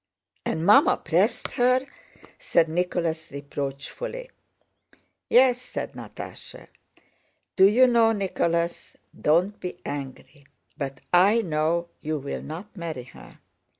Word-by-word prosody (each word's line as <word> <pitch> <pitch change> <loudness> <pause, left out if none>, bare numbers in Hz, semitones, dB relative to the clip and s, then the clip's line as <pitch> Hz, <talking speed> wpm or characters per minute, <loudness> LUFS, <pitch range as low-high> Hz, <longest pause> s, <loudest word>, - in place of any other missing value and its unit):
"And 160 +1 -1
Mamma 205 +2 +6
pressed 180 +8 0
her!" 255 +1 +2 0.5
said 165 -1 +2
Nicholas 165 -1 -2
reproachfully. 140 - -6 1.0
"Yes," 250 0 +5
said 250 - -5
Natásha. - - -10 0.9
"Do 190 0 +7
you 240 +6 +5
know, 235 -2 +4
Nicholas—don't 170 -1 -1
be 180 -1 -6
angry—but 140 0 -8
I 200 +6 +5
know 165 +1 0
you 155 0 -2
will 140 0 -5
not 180 +8 -8
marry 165 -8 -5
her. 125 - -15
170 Hz, 100 wpm, -25 LUFS, 155-210 Hz, 1.0 s, Do